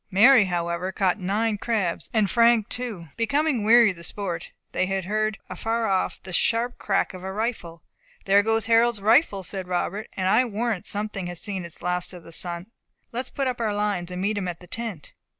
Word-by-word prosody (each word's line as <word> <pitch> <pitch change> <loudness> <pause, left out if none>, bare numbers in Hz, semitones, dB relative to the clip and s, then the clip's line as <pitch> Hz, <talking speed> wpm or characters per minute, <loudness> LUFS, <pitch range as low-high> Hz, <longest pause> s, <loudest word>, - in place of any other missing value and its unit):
Mary, 220 +4 +7
however, 175 0 -2
caught 190 +1 +1
nine 210 +3 0
crabs, 205 -8 -1
and 215 -5 +2
Frank 235 -2 +4
two. 215 -10 -4
Becoming 260 +1 +1
weary 230 0 +6
of 180 - -11
the 170 - -10
sport, 175 -2 -3 0.2
they 185 - 0
heard 205 +3 -1
afar 225 +5 -2
off 190 -3 0
the 185 - -8
sharp 235 +7 +1
crack 195 -1 0
of 185 -1 -9
a 190 - -4
rifle. 190 -6 -4 0.4
"There 200 +1 +5
goes 225 0 +1
Harold's 230 0 +3
rifle!" 210 -1 +3
said 190 0 -5
Robert; 185 +4 -2
"and 185 -1 0
I 215 +6 +5
warrant 225 -3 -2
something 205 -3 -3
has 175 -1 -5
seen 190 -1 -3
its 170 0 -13
last 180 +1 -1
of 175 -2 -10
the 165 - -13
sun. 175 +4 -2 0.4
Let 235 - -3
us - - -10
put 275 - -2
up 250 -2 -2
our 215 -2 0
lines, 205 -4 -1
and 180 +1 -4
meet 205 +1 0
him 185 - -3
at 175 -1 -5
the 180 - -13
tent." 210 -4 -6
205 Hz, 205 wpm, -25 LUFS, 180-225 Hz, 0.4 s, Mary